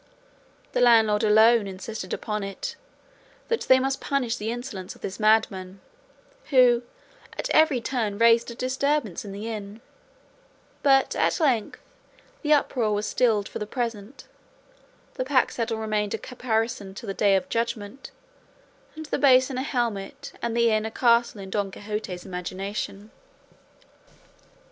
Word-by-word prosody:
The - - 0
landlord 225 -3 +5
alone 220 0 +5
insisted 190 +1 -7
upon 210 -1 -3
it 195 0 -5 0.7
that 465 - 0
they 260 - +8
must 270 +1 -1
punish 255 -5 -1
the 215 +1 -4
insolence 215 -6 -6
of - - -20
this 190 - -6
madman, 200 -3 +1 0.7
who 250 -4 +5 0.6
at - - -3
every 310 -5 +4
turn 225 -5 -2
raised 230 +1 +4
a 235 - -7
disturbance 255 - -1
in 205 - -8
the 205 +3 -6
inn; 210 -1 -6 1.0
but 270 -1 +3
at - - +1
length 255 -9 +1 0.6
the 300 - -1
uproar 255 -6 +2
was 205 +1 -2
stilled 215 -3 +1
for - - -7
the 210 - -4
present; 230 0 -5 0.9
the 255 - 0
pack 260 -1 +2
saddle 230 -1 -2
remained 215 -2 -1
a - - -4
caparison 225 -5 -3
till 220 - -8
the 195 - -3
day 200 0 +3
of 185 -1 0
judgment, 230 +1 -3 0.9
and 315 0 -7
the - - -2
basin 260 -1 +4
a - - -1
helmet 235 -7 -3
and 235 0 -2
the 235 -1 +4
inn 215 0 +1
a 220 - -3
castle 235 -1 +2
in 190 0 -9
Don 200 -1 -1
Quixote's 205 -3 -6
imagination. 195 +3 -5
225 Hz, 145 wpm, -25 LUFS, 205-250 Hz, 1.0 s, they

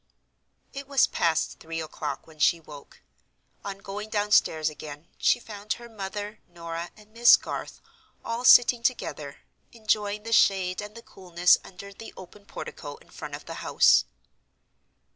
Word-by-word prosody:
It 275 0 -7
was 275 -2 +4
past 165 -1 0
three 165 0 -6
o'clock 150 -3 -5
when 160 -1 -18
she 170 +2 +3
woke. 150 - -14 0.6
On 200 -1 -5
going 205 +2 -7
downstairs 205 -7 +2
again 150 0 -7
she 245 - +3
found 210 -2 -5
her 235 - -11
mother, 205 -1 -6
Norah 170 0 -7
and 210 0 -18
Miss 235 +1 +7
Garth - - -7 0.5
all 230 +1 -3
sitting 245 -1 +7
together 190 - -3 0.3
enjoying 210 -2 -1
the 230 0 -3
shade 185 -3 +3
and 210 +1 -9
the 230 - -11
coolness 180 -1 +2
under 200 +2 -11
the 225 - -11
open 190 +2 -13
portico - - -8
in - - -21
front - - -7
of - - -11
the - - -7
house. - - +4
200 Hz, 150 wpm, -26 LUFS, 170-220 Hz, 0.6 s, Miss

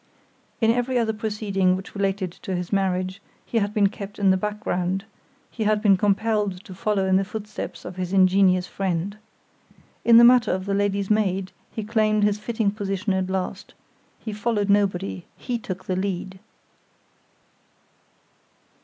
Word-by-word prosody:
In 225 0 +5
every 245 +2 0
other 225 -2 +1
proceeding 205 -4 0
which 190 +1 -8
related 195 -2 -1
to 190 - -3
his 180 +2 -4
marriage, 185 -1 0 0.2
he 230 - 0
had 205 -1 -1
been 210 -1 +3
kept 200 -1 -9
in 195 -2 +4
the - - +4
background; 195 -1 -2 0.5
he 220 - -3
had 210 0 +3
been 205 -2 +5
compelled 205 -1 0
to 195 - -10
follow 195 +1 0
in 190 0 +3
the 195 - +2
footsteps 210 +1 -7
of 180 +1 -7
his 180 -1 -3
ingenious 185 -1 +4
friend. 190 +1 -2 0.9
In 235 -1 +7
the 235 - +9
matter 245 -2 +6
of 185 +1 -2
the 200 - -1
lady's 200 0 0
maid 195 -3 +1 0.2
he 220 - -5
claimed 215 -1 +2
his 210 0 +2
fitting 220 -2 0
position 200 -1 -2
at 190 0 -1
last—he 190 +3 -7
followed 205 -1 0
nobody; 195 -3 0
he 245 -2 -3
took 190 -4 -6
the 185 - -1
lead! 190 0 -3
200 Hz, 155 wpm, -24 LUFS, 190-215 Hz, 0.9 s, the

